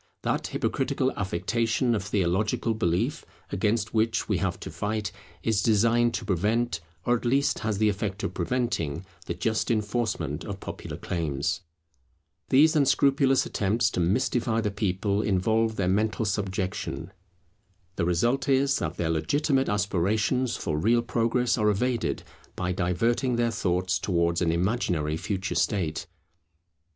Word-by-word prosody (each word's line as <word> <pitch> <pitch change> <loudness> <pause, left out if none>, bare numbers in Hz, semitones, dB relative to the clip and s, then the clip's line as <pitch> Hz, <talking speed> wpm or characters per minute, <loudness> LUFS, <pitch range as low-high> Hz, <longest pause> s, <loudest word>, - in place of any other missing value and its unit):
That - - 0
hypocritical - - 0
affectation 115 +6 0
of 105 - -1
theological 105 +3 0
belief 90 -5 0 0.3
against 105 +4 0
which 115 +1 +1
we - - +1
have - - -1
to - - -6
fight, 105 -1 -2 0.3
is 110 -3 +2
designed 115 +2 +3
to 110 - -4
prevent, 105 +1 0 0.2
or 120 - +3
at 115 - -4
least 135 +4 +2
has 110 -2 -1
the 110 +1 +3
effect 100 +1 -2
of - - -2
preventing, 95 - -1 0.2
the 85 - -2
just 110 +5 -1
enforcement 105 - -1
of 100 -1 -6
popular - - -7
claims. 80 +1 -2 0.9
These 155 +5 +5
unscrupulous 135 -1 +3
attempts 110 +3 +1
to - - -2
mystify 115 +5 +1
the 105 -2 -1
people 100 0 0
involve 110 +3 +1
their 95 -3 0
mental 105 +4 +1
subjection. 95 -5 -3 0.8
The 85 - 0
result 120 - +1
is, 135 +1 +3
that 80 +2 -3
their 80 -1 0
legitimate 135 - +1
aspirations 105 +5 +1
for 75 -2 -2
real 115 +7 +3
progress 120 +1 +1
are 105 0 +3
evaded, 120 +3 0 0.3
by 90 0 -1
diverting 115 +8 +1
their 120 0 +1
thoughts 90 -3 0
towards 85 -1 +1
an 85 -2 +2
imaginary 85 -4 0
future 95 +3 -3
state. 90 -4 0
105 Hz, 140 wpm, -27 LUFS, 90-120 Hz, 0.9 s, These